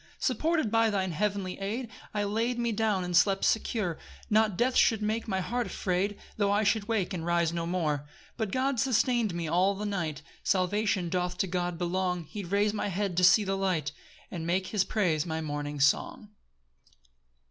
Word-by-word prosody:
3 - - -28
Supported 315 -8 +1
by 225 0 +4
thine 190 -3 -1
heavenly 195 +1 -2
aid, 220 +6 -3 0.2
I 210 -1 -1
laid 225 +4 0
me 235 -1 0
down 215 -3 +1
and 180 0 -2
slept 195 +2 +4
secure; 210 -6 0 0.3
Not 215 -3 +3
death 250 +3 +1
should 220 -3 +4
make 220 +2 -1
my 190 -3 -1
heart 240 +4 -2
afraid, 195 +2 -1 0.2
Tho' 205 -2 +2
I 205 +1 +2
should 210 0 +1
wake 210 -5 0
and 170 -3 -3
rise 170 -1 +1
no 170 -1 -2
more. 165 -4 0
4 145 - -16 0.3
But 220 -4 -2
God 260 +1 0
sustain'd 235 -4 +2
me 170 -1 -3
all 185 +5 +2
the 210 +2 -4
night; 170 -7 -3 0.2
Salvation 190 0 +1
doth 180 0 -1
to 195 - +1
God 175 -1 -2
belong; 180 0 -1
He 200 +6 -7
rais'd 200 +3 +1
my 210 - -2
head 195 -1 -2
to 180 - +3
see 190 +4 +7
the 195 -1 -1
light, 180 -6 0 0.4
And 165 -2 -5
make 185 +2 +1
his 205 -3 +3
praise 180 -6 0
my 160 0 -2
morning 145 -1 -4
song. 145 +9 +1
195 Hz, 190 wpm, -29 LUFS, 175-215 Hz, 0.4 s, see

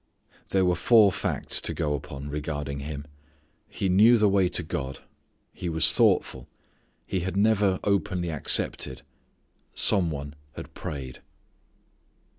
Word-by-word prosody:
There 95 -1 +2
were 90 0 +2
four 105 +2 +5
facts - - -1
to - - -4
go 75 -1 -1
upon 70 0 -7
regarding 75 -2 -4
him. 70 0 -7 0.6
He 95 - -3
knew 105 +6 +5
the 105 -1 +3
way 95 -2 +2
to 90 - -2
God. 70 -4 -5 0.5
He 90 - -5
was 80 0 +3
thoughtful. 65 -2 +1 0.6
He 95 - -2
had 95 +2 -4
never 100 -2 +2
openly 90 -4 -1
accepted. 70 -3 +1 0.7
Some 95 -5 +3
one 70 -1 -6 0.2
had - - -9
prayed. 65 -4 -7
85 Hz, 130 wpm, -26 LUFS, 70-95 Hz, 0.7 s, four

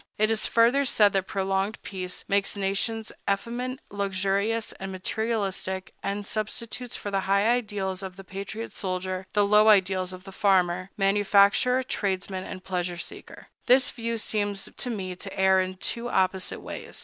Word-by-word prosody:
It 215 +1 +3
is 220 -1 0
further 235 +5 +4
said 210 -6 +4
that 195 -1 0
prolonged 195 +2 -1
peace 185 -2 -6
makes 200 +1 +1
nations 200 +3 -1 0.2
effeminate, 245 +6 -2
luxurious, 200 +3 0
and 195 0 -5
materialistic, 190 -1 -2
and 200 +1 -3
substitutes 230 +3 -4
for 205 - -5
the 195 - +1
high 200 +2 +4
ideals 205 -6 0
of 190 -1 -6
the 195 - -10
patriot 200 +4 -6
soldier 185 0 -3
the 205 -1 +4
low 210 +1 +6
ideals 190 -3 +4
of 185 0 -9
the 195 - -10
farmer, 185 -2 +2
manufacturer, 205 +5 +4
tradesman, 190 -5 -2
and 185 - -7
pleasure 180 -2 -2
seeker. - - -9 0.2
This 255 +1 +5
view 230 -1 -3
seems 205 -2 -1
to 250 - -3
me 190 -5 -3
to 195 +1 -8
err 190 0 +5
in 185 0 -3
two 235 +5 -3
opposite 190 -3 0
ways. - - -7
200 Hz, 160 wpm, -27 LUFS, 190-220 Hz, 0.2 s, low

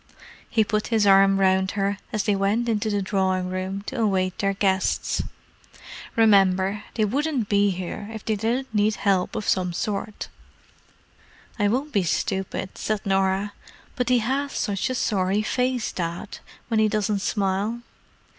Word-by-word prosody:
He 220 - +3
put 215 0 -1
his 220 -3 +2
arm 195 0 +6
round 190 0 +2
her 200 0 0
as 215 -2 -1
they 205 -2 +2
went 205 +5 +1
into 220 -1 0
the 205 -1 0
drawing 185 -2 0
room 190 +2 -3
to 235 +3 -4
await 185 -4 0
their 195 -1 +1
guests. 190 -1 +1 0.9
"Remember, 195 -2 +4
they 215 - +2
wouldn't 270 0 -1
be 205 0 +3
here 185 +3 -5
if 220 -2 -8
they 220 - +1
didn't 230 +4 -2
need 210 0 +2
help 195 -3 +1
of 215 - -3
some 180 -2 +1
sort." 205 +3 -3 1.3
"I 205 - +3
won't 265 +8 -1
be 200 - +3
stupid," 190 +2 -2
said 215 -2 -2
Norah. 195 +1 +1 0.4
"But 250 -1 -1
he 250 - +5
has 270 +5 -1
such 205 +2 -1
a 255 - -2
sorry 200 -2 +1
face, 250 0 0
Dad, 170 +2 -5 0.3
when 225 -2 +1
he 215 - +4
doesn't 210 -1 0
smile." 200 +3 -1
205 Hz, 155 wpm, -24 LUFS, 190-220 Hz, 1.3 s, arm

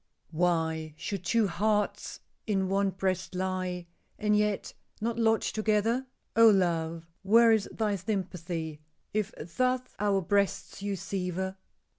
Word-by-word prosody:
"Why 160 -2 0
should 195 +1 -4
two 225 +4 +3
hearts 210 +3 -1 0.3
in 195 -3 +1
one 195 0 +2
breast 185 -1 -2
lie 185 -1 -2 0.3
And 210 0 +2
yet 210 -1 0 0.3
not 230 +1 -2
lodge 225 -1 +2
together? 220 +4 +1 0.3
Oh, 230 0 +8
love! 170 -4 +1 0.2
where 225 +4 +6
is 220 -2 +2
thy 210 -2 0
sympathy 175 -5 -3 0.3
If 215 0 0
thus 255 +10 0 0.2
our 200 -1 +2
breasts 200 +2 0
you 200 0 -1
sever?" 190 0 -3
195 Hz, 125 wpm, -29 LUFS, 180-215 Hz, 0.3 s, Oh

